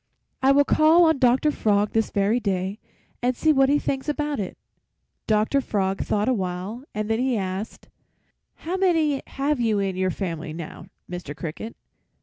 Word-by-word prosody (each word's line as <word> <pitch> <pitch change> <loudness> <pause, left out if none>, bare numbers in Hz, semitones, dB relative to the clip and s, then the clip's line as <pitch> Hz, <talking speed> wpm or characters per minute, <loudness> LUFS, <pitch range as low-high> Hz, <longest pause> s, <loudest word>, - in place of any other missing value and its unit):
I 265 +1 +5
will 285 +1 +5
call 315 +4 +5
on 320 -4 +3
Doctor 260 +4 +3
Frog 210 -5 +1
this 225 -1 +1
very 205 +4 +1
day, 195 -1 -2 0.4
and 250 +1 +1
see 315 -1 +3
what 270 -1 +4
he 290 - +4
thinks 275 0 -2
about 295 -2 -1
it.' 195 - -4 0.7
"Doctor 220 +6 +2
Frog 195 -5 -1
thought 210 0 0
awhile 195 0 -2
and 215 0 -2
then 225 +1 0
he 255 -2 +1
asked, 190 +2 -5 0.7
'How 350 +4 -4
many 325 -7 +2
have 280 0 -1
you 225 -3 +1
in 195 -2 -1
your 185 0 0
family, 165 -4 -4
now, 165 -1 -8 0.2
Mr. 175 -5 -6
Cricket?' 165 +9 -6
225 Hz, 165 wpm, -24 LUFS, 195-275 Hz, 0.7 s, I